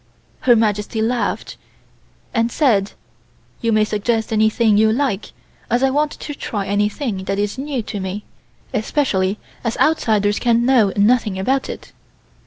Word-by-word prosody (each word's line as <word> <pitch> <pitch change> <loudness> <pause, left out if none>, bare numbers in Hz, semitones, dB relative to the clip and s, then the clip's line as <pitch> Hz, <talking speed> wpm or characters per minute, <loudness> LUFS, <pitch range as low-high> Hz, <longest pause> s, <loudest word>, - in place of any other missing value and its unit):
Her 240 - +8
Majesty 215 0 0
laughed, 235 +3 -1 0.8
and 230 -1 +1
said: 215 -10 +2 0.7
"You 230 - +1
may 215 -1 +4
suggest 220 +1 -1
anything 220 0 +3
you 220 +1 +4
like, 230 -4 -1 0.4
as 245 +3 +1
I 270 - +3
want 295 +2 +1
to 295 - -7
try 205 -7 -4
anything 205 +1 -1
that 195 - -1
is 205 +4 -2
new 270 -4 -3
to 205 - -5
me, 190 +2 -4 0.5
especially 215 -5 0 0.3
as 230 -1 -2
outsiders 215 -9 +2
can 235 -1 +2
know 240 -6 +4
nothing 210 -1 +3
about 260 +8 0
it." - - -8
220 Hz, 145 wpm, -19 LUFS, 205-245 Hz, 0.8 s, Her